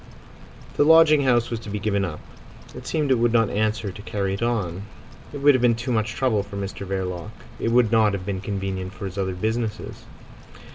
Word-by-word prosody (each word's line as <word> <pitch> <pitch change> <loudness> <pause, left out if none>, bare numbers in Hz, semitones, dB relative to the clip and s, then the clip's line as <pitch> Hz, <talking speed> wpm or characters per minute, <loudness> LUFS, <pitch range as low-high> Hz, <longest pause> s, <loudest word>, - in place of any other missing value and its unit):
The - - +5
lodging 155 -2 +6
house 120 -2 +2
was 115 - -2
to 110 - -9
be 105 - -3
given 100 -1 0
up. 85 -5 -4 0.5
It 125 0 -10
seems 150 -4 0
it 130 - +3
would 120 0 +2
not 115 -3 +3
answer 105 -1 -1
to 100 - -10
carry 100 -3 -2
it 100 - -5
on. 100 -7 -1 0.5
It 145 - -7
would 145 0 +7
have 130 - +1
been 120 -2 +4
too 120 +3 -4
much 110 -2 0
trouble 125 -6 +1
for 100 0 -8
Mr 100 0 -5
Verloc. 95 0 -3 0.3
It - - -1
would 120 -2 +3
not 110 -3 +4
have 95 -2 -4
been 95 -2 -3
convenient 95 -2 -4
for 100 - -7
his 95 +1 -5
other 95 -1 -2
business. 110 +2 -2
110 Hz, 210 wpm, -23 LUFS, 95-120 Hz, 0.5 s, would